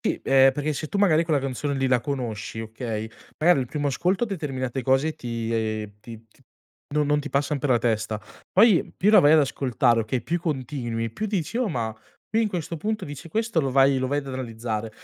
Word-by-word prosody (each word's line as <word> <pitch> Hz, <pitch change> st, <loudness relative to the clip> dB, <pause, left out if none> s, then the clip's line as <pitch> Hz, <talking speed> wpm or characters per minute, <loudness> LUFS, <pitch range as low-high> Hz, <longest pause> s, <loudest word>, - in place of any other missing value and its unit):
sì, -, -, -1 dB
perché 135 Hz, +3 st, +3 dB
se 155 Hz, +2 st, -5 dB
tu 200 Hz, -, -3 dB
magari 170 Hz, -5 st, +4 dB
quella 155 Hz, -3 st, +2 dB
canzone 135 Hz, +2 st, -2 dB
lì 135 Hz, 0 st, 0 dB
la 125 Hz, -2 st, +3 dB
conosci 115 Hz, -5 st, -4 dB
okay, 110 Hz, -1 st, -5 dB, 0.3 s
magari 165 Hz, -3 st, +4 dB
il 125 Hz, -, -2 dB
primo 145 Hz, +1 st, -2 dB
ascolto 185 Hz, -, +1 dB
determinate 135 Hz, -, -3 dB
cose 135 Hz, +4 st, +2 dB
ti, 115 Hz, -4 st, -4 dB
ehm, 110 Hz, -2 st, -2 dB
ti 115 Hz, 0 st, -11 dB
ti 110 Hz, -, -29 dB, 0.5 s
no 150 Hz, -1 st, +3 dB
non 150 Hz, 0 st, +2 dB
ti 150 Hz, -, -6 dB
passan 140 Hz, +1 st, 0 dB
per 140 Hz, -, -2 dB
la 120 Hz, -, +5 dB
testa, 110 Hz, -2 st, -1 dB, 0.3 s
poi, 205 Hz, -2 st, +4 dB
più 205 Hz, +3 st, +3 dB
la 220 Hz, -, +8 dB
vai 145 Hz, +1 st, +6 dB
ad 160 Hz, -, +7 dB
ascoltare, 125 Hz, -4 st, +1 dB
okay, 115 Hz, +2 st, -2 dB
più 170 Hz, +6 st, -2 dB
continui, 125 Hz, -7 st, -3 dB
più 215 Hz, -, -4 dB
dici: 200 Hz, +1 st, -2 dB
"Oh, 245 Hz, -4 st, +1 dB
ma 115 Hz, -8 st, -2 dB, 0.3 s
qui 225 Hz, +2 st, +1 dB
in 215 Hz, -, +1 dB
questo 170 Hz, -3 st, -4 dB
punto 215 Hz, +3 st, -2 dB
dice 145 Hz, +3 st, -8 dB
questo" 220 Hz, -2 st, 0 dB
lo 135 Hz, -2 st, -1 dB
vai 135 Hz, 0 st, +4 dB
lo 130 Hz, -, -1 dB
vai 145 Hz, +1 st, 0 dB
ad 140 Hz, -, -5 dB
analizzare. 115 Hz, -3 st, -4 dB
135 Hz, 210 wpm, -25 LUFS, 115-155 Hz, 0.5 s, la